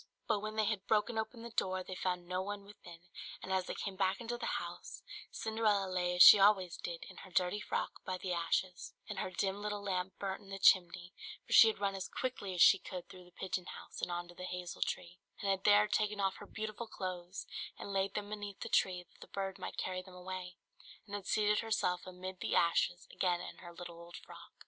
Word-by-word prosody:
But 215 -2 +2
when 215 +1 -5
they 215 -1 +2
had 200 -2 -1
broken 220 +1 +2
open 230 +1 -4
the 235 - -7
door 185 -3 0
they 185 - -7
found 180 -1 -2
no 180 +1 -1
one 200 +1 -5
within; 175 -5 -13 0.4
and 190 - -2
as 185 -1 +1
they - - -3
came 195 -2 -4
back 190 0 +1
into 240 0 -3
the 240 - -4
house, - - -7 0.3
Cinderella 215 -3 +1
lay 180 -1 0
as 180 - +10
she 210 - +12
always 195 -3 +5
did, 170 -1 -5
in 185 - -12
her 190 - -10
dirty 180 +2 +1
frock - - -3
by 185 -1 -3
the 180 0 -3
ashes, 175 +1 -1
and 210 -2 -4
her - - -2
dim 195 +2 -1
little 210 -1 -3
lamp 185 -1 -2
burnt 195 +1 -3
in 195 - -15
the 195 - -4
chimney; 180 -1 +4 0.3
for - - -4
she 225 - +10
had 220 - +1
run 200 -1 0
as 190 -1 -4
quickly 205 -7 -3
as 175 - +7
she 195 - +8
could 180 -2 -7
through 180 -1 -12
the 175 - -18
pigeon 185 0 -3
house - - -9
and - - -1
on 175 0 -3
to 175 - -13
the 180 +1 -7
hazel 180 -1 -5
tree, 180 0 -2 0.2
and 200 - +1
had 190 0 -1
there 210 0 +7
taken 210 0 0
off 195 -1 +1
her - - -10
beautiful 220 +2 -5
clothes, 185 -2 -5 0.3
and 200 - -6
laid 195 0 0
them 205 -1 -3
beneath 205 -2 -6
the - - -4
tree, 180 -1 +2
that - - -27
the - - -10
bird 195 -1 -3
might - - -6
carry 185 0 -2
them 185 0 -14
away, 180 0 -6 0.5
and 205 - -12
had 205 -2 -4
seated 210 0 +3
herself 215 -6 0
amid 185 0 -7
the - - -1
ashes 175 +1 +2
again 180 -2 +1
in - - -7
her 175 -1 -10
little 170 0 -9
old 170 0 -10
frock. - - -12
190 Hz, 235 wpm, -35 LUFS, 180-205 Hz, 0.5 s, she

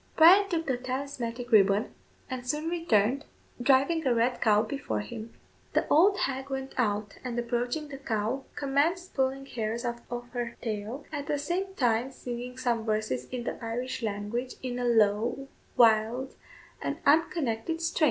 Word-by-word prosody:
Bryan 380 +5 +7
took 330 -2 -1
the 265 -4 0
talismanic 250 -2 -4
ribbon, 200 -1 +4 0.3
and 255 -2 -5
soon 300 +4 -1
returned, 275 -6 +2 0.4
driving 280 +6 +3
a 245 - +3
red 240 +2 +1
cow 215 -1 +4
before 215 - -3
him. 215 - -8 0.4
The - - +2
old 390 +6 +5
hag 270 0 -2
went 270 0 -4
out, 210 -4 -1
and, 245 -2 -4
approaching 245 +5 -1
the 275 -1 -8
cow, 230 +1 -2
commenced 300 +6 0
pulling 270 0 0
hairs 230 -1 -3
out 235 0 -2
of 245 0 -5
her 240 -1 -4
tail, 220 +4 -4
at 290 -1 -4
the 295 - 0
same 365 +6 -2
time 245 -2 +2
singing 250 0 -6
some 240 -3 0
verses 215 - -1
in 250 -2 -5
the 240 - -5
Irish 245 +3 -3
language 220 +4 -3
in 250 -1 -3
a 245 - -1
low, 230 +3 +2 0.3
wild, 230 +2 +4 0.5
and - - -2
unconnected 310 -2 +2
strain. 330 0 -1
250 Hz, 160 wpm, -29 LUFS, 225-280 Hz, 0.5 s, Bryan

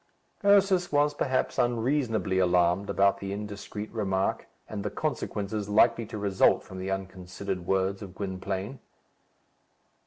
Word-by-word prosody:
Ursus 195 -3 +4
was 145 0 +3
perhaps 130 -3 -1
unreasonably 120 -5 +1
alarmed 90 +1 +2
about 100 0 +3
the 100 0 -5
indiscreet 105 +1 -6
remark, 95 -4 -1 0.2
and 105 -2 -5
the 105 - -1
consequences 105 -6 -3
likely 110 +2 +4
to 110 - -6
result 100 -2 +3
from 95 - -9
the 95 +1 -4
unconsidered 95 -1 -5
words 95 0 0
of 95 -3 -9
Gwynplaine. 95 +4 -4
100 Hz, 125 wpm, -28 LUFS, 95-115 Hz, 0.2 s, Ursus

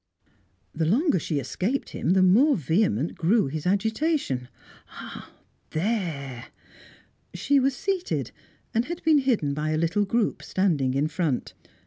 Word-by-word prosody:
The 160 0 -1
longer 235 - +2
she 155 -1 -2
escaped 200 - -2
him, 175 - 0
the 190 -1 +4
more 250 +11 +5
vehement 160 - +1
grew 205 +7 +2
his 155 +4 -4
agitation. 220 - 0 0.5
Ah, - - -9 0.4
there! 155 - -2 0.9
She 285 -1 +2
was 270 0 +1
seated, 385 -2 -2 0.4
and 230 +1 +1
had 345 +3 -6
been 315 -2 +5
hidden 230 - +1
by 150 +2 -2
a 155 - 0
little 175 +6 +1
group 225 +2 0
standing 150 -9 0
in 145 +3 +1
front. 155 -5 -2
185 Hz, 135 wpm, -25 LUFS, 155-245 Hz, 0.9 s, more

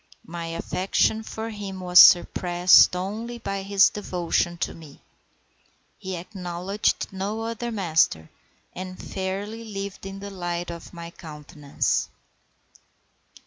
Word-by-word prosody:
My 170 0 -6
affection 185 +6 0
for 220 +1 -6
him 200 -3 -7
was 180 -1 +5
surpassed 175 +1 +6
only 215 +6 -4
by 195 -4 -4
his 195 0 +4
devotion 175 -3 -1
to - - -3
me. 155 -4 -14 1.0
He 190 0 -5
acknowledged 180 +2 -3
no 200 +4 -3
other 230 +1 -4
master, 160 - +1 0.4
and 185 0 -7
fairly 200 +4 -5
lived 200 -3 -6
in 195 0 -7
the 200 +1 -8
light 175 -2 -4
of 170 -1 -10
my 170 -1 -9
countenance. 150 -3 -3
190 Hz, 115 wpm, -25 LUFS, 175-200 Hz, 1.0 s, surpassed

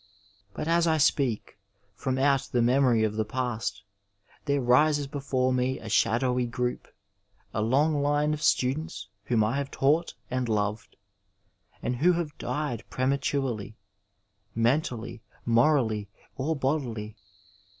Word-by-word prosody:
But 155 - -4
as 170 0 +3
I 160 -1 +3
speak, 135 -8 +1 0.3
from 130 +5 -2
out 135 0 +2
the 120 -1 +2
memory 125 -2 +3
of 110 -1 0
the 110 - +2
past 115 -2 -3 0.6
there 140 -1 +1
rises 145 +4 +3
before 135 -2 -1
me 130 +1 0
a 110 - -8
shadowy 125 +3 +2
group, 125 +1 -3 0.7
a 110 - -1
long 145 +6 +2
line 145 +1 +2
of 150 - -4
students 130 -7 0 0.2
whom 115 -3 +2
I 115 +6 0
have 140 -1 -2
taught 150 0 +1 0.2
and 125 -2 -1
loved, 105 0 -2 0.9
and 125 - -1
who 175 +7 +4
have 165 -3 -3
died 145 -6 -3
pre 130 - -1
maturely 130 -6 -1 0.4
— 100 0 -45
mentaliy, 120 -1 0 0.2
morally, 115 -4 +2 0.3
or 155 +5 -1
bodily. 125 -7 -2
130 Hz, 135 wpm, -27 LUFS, 115-145 Hz, 0.9 s, who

